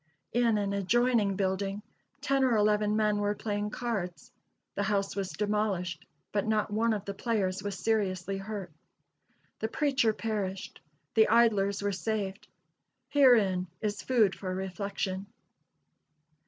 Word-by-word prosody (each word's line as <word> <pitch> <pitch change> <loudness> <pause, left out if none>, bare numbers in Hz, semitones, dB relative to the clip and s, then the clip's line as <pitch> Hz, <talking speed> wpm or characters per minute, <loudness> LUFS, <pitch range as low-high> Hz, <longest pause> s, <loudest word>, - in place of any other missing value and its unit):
In 235 -2 +3
an 200 -1 -1
adjoining 210 +1 +2
building, 195 +1 -1 0.4
ten 275 0 +2
or 250 -3 +3
eleven 210 0 +2
men 210 -1 +2
were 205 0 0
playing 205 -1 -2
cards. 210 -7 -4 0.4
The - - -2
house 200 -1 0
was 195 -2 -2
demolished, 205 -5 -1 0.2
but 205 +1 0
not 215 -1 0
one 225 +1 +2
of 205 -2 -4
the 200 - -4
players 195 -4 -1
was 200 -2 -4
seriously 195 -4 0
hurt. 195 -3 -6 0.9
The 220 - -1
preacher 265 -3 +2
perished; 205 -4 -4 0.3
the 220 -1 +5
idlers 210 -3 +3
were 205 - +1
saved 200 0 -3 0.6
herein 215 -10 +4
is 210 -1 -2
food 225 -7 +3
for 185 -2 -4
reflection. 190 +1 -3
205 Hz, 130 wpm, -30 LUFS, 195-220 Hz, 0.9 s, the